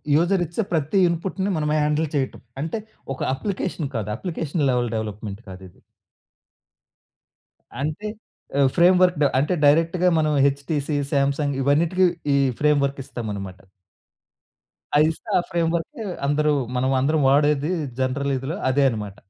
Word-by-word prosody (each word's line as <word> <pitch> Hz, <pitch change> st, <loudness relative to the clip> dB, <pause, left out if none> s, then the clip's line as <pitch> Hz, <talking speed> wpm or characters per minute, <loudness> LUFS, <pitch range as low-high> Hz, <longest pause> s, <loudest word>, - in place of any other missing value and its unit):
User 175 Hz, +4 st, +2 dB
ఇచ్చే 170 Hz, +7 st, -3 dB
ప్రతి 160 Hz, +4 st, +1 dB
ఇన్పుట్‌ని 190 Hz, +3 st, -2 dB
మనము 150 Hz, -1 st, 0 dB
హ్యాండిల్ 150 Hz, +1 st, +1 dB
చేయటం. 135 Hz, -2 st, -2 dB, 0.2 s
అంటే 165 Hz, +8 st, -3 dB, 0.3 s
ఒక 130 Hz, -, -10 dB
అప్లికేషన్ 170 Hz, -2 st, -3 dB
కాదు. 105 Hz, -2 st, -2 dB
Application 160 Hz, -2 st, -2 dB
level 125 Hz, -1 st, +1 dB
development 105 Hz, -1 st, -5 dB
కాదిది. 95 Hz, -1 st, -11 dB, 2.1 s
అంటే 155 Hz, +9 st, -3 dB, 0.5 s
ఆ -, -, +5 dB, 0.2 s
ఫ్రేమ్‌వర్క్ 180 Hz, 0 st, +5 dB, 0.2 s
అంటే 150 Hz, +6 st, +1 dB
డైరెక్ట్‌గా 165 Hz, +5 st, +3 dB
మనం 155 Hz, -1 st, +1 dB
'హెచ్‌టిసి', 140 Hz, +1 st, -1 dB
'సామ్సంగ్' 140 Hz, 0 st, +1 dB
ఇవన్నిటికి 170 Hz, +7 st, +3 dB, 0.3 s
ఈ -, -, +4 dB, 0.2 s
ఫ్రేమ్ 150 Hz, -1 st, +3 dB
వర్క్ 140 Hz, 0 st, -4 dB
ఇస్తాం 120 Hz, -4 st, -6 dB
అన్నమాట. 95 Hz, -2 st, -7 dB, 1.4 s
అది 155 Hz, +1 st, +5 dB
ఇస్తే 160 Hz, -, -11 dB
ఆ -, -, +4 dB
ఫ్రేమ్వర్క్ 170 Hz, -1 st, 0 dB, 0.4 s
అందరు 150 Hz, +1 st, +2 dB, 0.2 s
మనం 130 Hz, +1 st, +1 dB
అందరం 155 Hz, +3 st, +2 dB
వాడేది 145 Hz, +2 st, +2 dB, 0.3 s
జనరల్ 135 Hz, +2 st, 0 dB
ఇదిలో 135 Hz, +6 st, -4 dB
అదే 140 Hz, +2 st, +2 dB
అన్నమాట. 105 Hz, -4 st, -5 dB
150 Hz, 125 wpm, -23 LUFS, 135-165 Hz, 2.1 s, ఆ